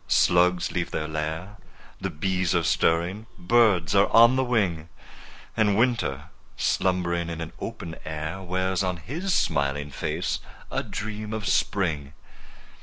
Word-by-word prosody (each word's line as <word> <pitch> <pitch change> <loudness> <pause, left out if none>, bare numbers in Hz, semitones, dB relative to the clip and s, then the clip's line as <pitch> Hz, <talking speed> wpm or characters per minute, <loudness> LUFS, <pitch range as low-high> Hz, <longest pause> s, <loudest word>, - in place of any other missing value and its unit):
Slugs 90 0 +3
leave 85 -1 -2
their 75 - -3
lair— 80 +6 -4 0.4
The - - -2
bees 90 +2 0
are 85 - +2
stirring—birds 95 +3 +2
are 100 0 +5
on 120 +2 +6
the 130 - +2
wing— 95 -10 0 0.7
And 105 -3 +3
Winter, 115 - 0 0.3
slumbering 85 -2 0
in 85 - -4
the 80 -1 -5
open 80 -1 -6
air, 80 +4 -4
Wears 95 0 -1
on 90 -1 -1
his 160 - -4
smiling 70 - 0
face - - -2 0.3
a - - 0
dream 105 +1 -5
of 110 -2 -3
Spring! 75 -8 0
90 Hz, 130 wpm, -26 LUFS, 80-105 Hz, 0.7 s, on